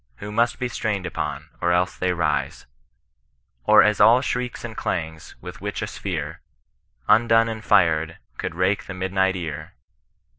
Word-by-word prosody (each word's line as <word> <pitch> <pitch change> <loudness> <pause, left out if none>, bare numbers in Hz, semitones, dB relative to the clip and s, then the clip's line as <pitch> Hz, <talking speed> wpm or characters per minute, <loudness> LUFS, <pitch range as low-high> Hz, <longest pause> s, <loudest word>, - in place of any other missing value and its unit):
Who 105 +7 -8
must 120 +3 +1
be 125 - -2
strained 105 -5 -2
upon, 75 -3 -4
or 85 - +2
else 90 +1 +1
they 90 0 0
rise; 75 -6 -1 1.0
Or - - +7
as 105 -1 +2
all 115 +3 +7
shrieks 125 -2 -3
and 115 -2 -7
clangs; 80 -5 -4
with - - -9
which - - -4
a - - 0
sphere - - -5 0.7
Undone 115 0 +4
and 110 -1 -5
fired, 80 -3 +2 0.2
could - - -4
rake 95 +3 0
the 95 - -7
midni^t 95 0 0
ear. 75 -4 -6
95 Hz, 155 wpm, -23 LUFS, 80-110 Hz, 1.0 s, Or